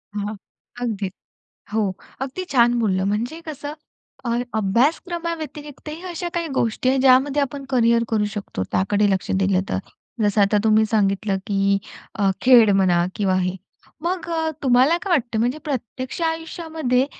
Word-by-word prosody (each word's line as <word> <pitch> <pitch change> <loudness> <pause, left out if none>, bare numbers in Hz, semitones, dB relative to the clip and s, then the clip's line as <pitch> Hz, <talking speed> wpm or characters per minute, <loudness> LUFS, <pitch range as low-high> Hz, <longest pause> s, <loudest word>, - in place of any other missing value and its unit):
हां, 205 +1 -3 0.5
अगदीच 205 -5 -2 0.6
हो. 220 - +2 0.4
अगदी 275 +8 -3
छान 240 -1 +4
बोललं. 190 -4 +1
म्हणजे 240 +11 -2
कसं 290 0 -5 0.5
अ, - - -1 0.3
अभ्यासक्रमाव्यतिरिक्तही 305 - -2
अशा 345 +1 -4
काही 340 -1 -1
गोष्टी 235 +1 +1
आहेत, 265 0 +2
ज्यामध्ये 270 +2 +4
आपण 280 0 -3
करियर 235 -2 +3
करू 215 -2 +1
शकतो 200 - -4
त्याकडे 205 +2 +2
लक्ष 190 -1 -1
दिलं 190 -1 +2
तर. 95 - 0 0.4
जसं 205 0 +3
आता 200 +1 +3
तुम्ही 220 0 +4
सांगितलं, 200 -1 +1
की 195 -1 +2 0.4
अ, 200 -2 +2
खेळ 240 -5 +7
म्हणा 180 -3 +3
किंवा 190 -3 +1
हे. 180 0 -1 0.5
मग 350 0 -2
अ, 320 -1 0
तुम्हाला 260 +6 +4
काय 390 - -3
वाटतं, 235 -6 0
म्हणजे 245 +6 +1
प्रत्यक्ष 255 +2 -4
आयुष्यामध्ये 320 -5 -1
240 Hz, 145 wpm, -22 LUFS, 205-295 Hz, 0.6 s, खेळ